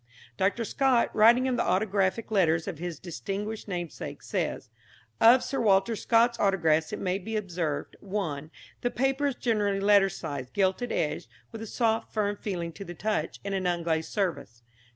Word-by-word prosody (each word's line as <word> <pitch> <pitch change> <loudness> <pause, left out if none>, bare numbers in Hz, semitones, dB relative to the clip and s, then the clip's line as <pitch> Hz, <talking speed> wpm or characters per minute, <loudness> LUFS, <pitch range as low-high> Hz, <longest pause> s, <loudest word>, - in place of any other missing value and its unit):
Dr. 200 - 0
Scott, 260 -1 +2
writing 235 +4 +6
of 255 -1 0
the - - +2
autographic 195 +2 0
letters 165 -5 +2
of 175 -6 -5
his 175 -2 -4
distinguished 200 +6 -5
namesake, 175 -5 -5
says: - - -3 0.5
"Of 240 +3 +7
Sir 275 - -2
Walter 200 +1 +3
Scott's 235 +2 +2
autographs 165 -6 +2
it - - -3
may 185 0 -1
be 220 +4 -5
observed 175 -7 -3
(1) 165 -8 -4 0.3
the 245 - +1
paper 270 +3 0
is 275 - -2
generally 205 -5 0
letter 200 -1 +5
size, 140 -8 -6
gilt 190 - +1
edged, 245 - -2 0.2
with 225 -2 -8
a 225 - -6
soft, 225 0 0
firm 205 -2 0
feeling 175 -5 -4
to 200 +5 -9
the 175 -2 -8
touch, 215 +5 -2
and 200 - -2
an 190 -1 0
unglazed 165 -2 -1
surface. 140 - -3
195 Hz, 170 wpm, -28 LUFS, 175-225 Hz, 0.5 s, Of